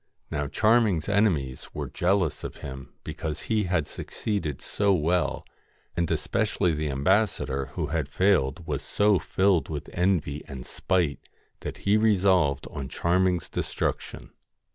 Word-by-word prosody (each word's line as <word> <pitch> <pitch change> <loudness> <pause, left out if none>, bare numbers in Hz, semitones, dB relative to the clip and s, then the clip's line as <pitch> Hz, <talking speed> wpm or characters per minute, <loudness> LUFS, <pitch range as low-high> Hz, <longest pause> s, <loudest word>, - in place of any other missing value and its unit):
Now 75 -1 -1
Charming's 110 -3 +3
enemies 90 -11 +1
were - - -3
jealous 90 -4 0
of - - -5
him 65 -2 -8
because 80 -2 -4
he 110 -3 0
had 90 -5 0
succeeded 95 -10 -3
so 100 -1 +1
well, 85 +1 +1 0.5
and 85 -1 0
especially 100 -5 +1
the 75 0 -2
ambassador 70 -3 +1
who 85 - -1
had 80 -4 -1
failed 85 -5 +2
was 75 -3 -2
so 105 -2 +2
filled 95 -3 +2
with 75 -3 -5
envy 85 -6 +1
and 65 -2 -7
spite 90 -6 -1 0.3
that - - -7
he 100 +2 +5
resolved 95 -9 +3
on 70 -2 -5
Charming's 90 0 +1
destruction. - - -3
85 Hz, 135 wpm, -27 LUFS, 75-100 Hz, 0.5 s, he